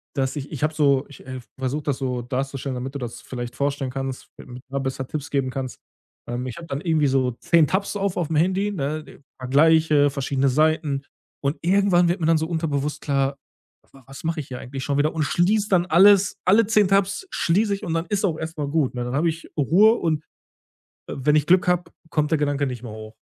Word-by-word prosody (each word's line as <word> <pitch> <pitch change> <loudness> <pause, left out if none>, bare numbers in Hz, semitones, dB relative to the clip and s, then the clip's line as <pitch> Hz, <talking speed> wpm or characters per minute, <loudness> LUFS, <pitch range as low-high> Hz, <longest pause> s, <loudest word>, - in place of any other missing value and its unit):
dass 135 -1 -1
ich 145 -1 -6
ich 150 -3 -5
habe 155 +1 +1
so 140 -3 +2
ich, 145 - -14
äh, 130 -1 -6 0.2
versuche 135 +3 -2
das 140 -3 -1
so 125 -2 -2
darzustellen, 135 +1 -3
damit 130 +2 -5
du - - -3
das 120 -1 -6
vielleicht 120 -1 -6
vorstellen 140 -2 -1
kannst, 135 0 -5
damit 125 0 -11
da 140 +1 -2
besser 130 -1 -3
Tipps 145 0 -5
geben 135 -2 0
kannst. 130 -1 -5 0.5
Ähm, 120 +1 -3
ich 125 - -7
habe 165 -1 -9
dann 135 +2 -4
irgendwie 160 -4 +2
so 130 -2 +1
10 160 +6 +3
Tabs 200 +2 -1
auf 200 -2 -1
aufm 160 -2 -1
Handy, 190 +6 +1
ne, 150 -3 -5 0.2
vergleiche 150 +2 +4
verschiedene 135 0 0
Seiten 150 0 +1 0.4
und 140 +2 -1
irgendwann 180 0 +3
wird 175 - 0
mir 160 - -1
dann 165 -1 +4
so 160 - -2
unterbewusst 150 -3 -2
klar: 140 -1 0 0.6
„Was 135 0 -13
mache 165 -1 -1
ich 140 - -8
hier 125 -1 -6
eigentlich 130 +1 -6
schon 140 0 -1
wieder“, 155 +3 +1
und 160 - 0
schließe 205 +7 +1
dann 180 -2 +3
alles, 195 +3 +5
alle 210 +4 +5
10 210 -2 +3
Tabs 200 - +1
schließe 200 +6 +1
ich 195 - -7
und 165 - -2
dann 165 +1 -1
ist 205 -2 -1
es - - -5
auch 165 -5 0
erstmal 160 -3 -4
gut, 145 -4 0
ne? 125 -1 -3
Dann 125 +2 -4
habe 160 +4 +2
ich 165 +1 -9
Ruhe 195 - +5
und, 160 -8 -1 0.9
äh, - - -5
wenn 150 +3 +2
ich 150 -1 +3
Glück 180 +1 +4
habe, 175 -1 +1 0.2
kommt 150 0 0
der 155 - +2
Gedanke 145 -1 0
nicht 125 -3 -5
mehr 115 - -7
hoch. 110 0 -10
150 Hz, 220 wpm, -23 LUFS, 135-170 Hz, 0.9 s, alles